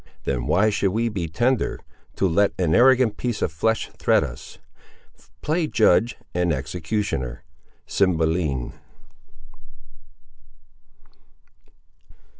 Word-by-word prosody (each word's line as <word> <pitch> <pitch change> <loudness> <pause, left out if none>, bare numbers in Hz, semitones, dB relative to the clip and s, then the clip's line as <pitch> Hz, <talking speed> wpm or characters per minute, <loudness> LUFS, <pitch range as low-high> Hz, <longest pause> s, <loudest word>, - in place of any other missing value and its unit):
Then 60 -3 -2
why 105 +4 +3
should 100 -1 +1
we 115 +2 0
be 95 -6 -3
tender 120 +10 0 0.4
To 95 - +1
let 100 +4 +2
an 85 -4 +1
arrogant 125 -3 +4
piece 120 -3 -2
of - - 0
flesh 110 +8 -1
threat - - +3
us! 60 +2 -9 0.9
Play 160 +2 0
judge 110 -1 +3 0.2
and 90 -1 +1
executioner. 75 - -3 0.4
—Cymbeline. 80 -7 0
95 Hz, 95 wpm, -23 LUFS, 80-115 Hz, 0.9 s, arrogant